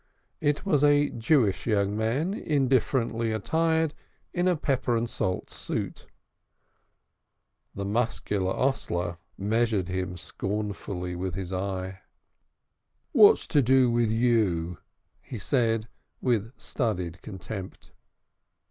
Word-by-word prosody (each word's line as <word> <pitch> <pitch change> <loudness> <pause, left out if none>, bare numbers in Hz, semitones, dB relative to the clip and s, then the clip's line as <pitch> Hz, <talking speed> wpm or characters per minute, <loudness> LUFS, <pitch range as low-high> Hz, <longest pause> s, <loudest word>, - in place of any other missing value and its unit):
It 145 +5 0
was 150 -7 +2
a 145 0 +5
Jewish 115 - +2
young 100 -2 +1
man, 125 - 0
indifferently 130 - +1
attired 160 +6 +1 0.4
in 175 +1 +1
a 180 - +4
pepper 130 -5 0
and 115 +1 -1
salt 95 -4 -2
suit. - - -4 1.7
The 100 - -3
muscular 105 -3 0
hostler 90 -9 -1 0.2
measured 105 -2 +1
him 90 -1 -3
scornfully 100 -2 -4
with 90 -1 -3
his 95 -1 -4
eye. 95 0 -3 1.1
"What's - - +7
to 145 - +4
do 130 -1 +4
with 120 -1 +2
you?" 105 -8 +1 0.4
he 125 - -7
said, 115 0 +1 0.3
with 115 -3 0
studied 90 - -2
contempt. 95 -1 -8
110 Hz, 105 wpm, -27 LUFS, 95-130 Hz, 1.7 s, What's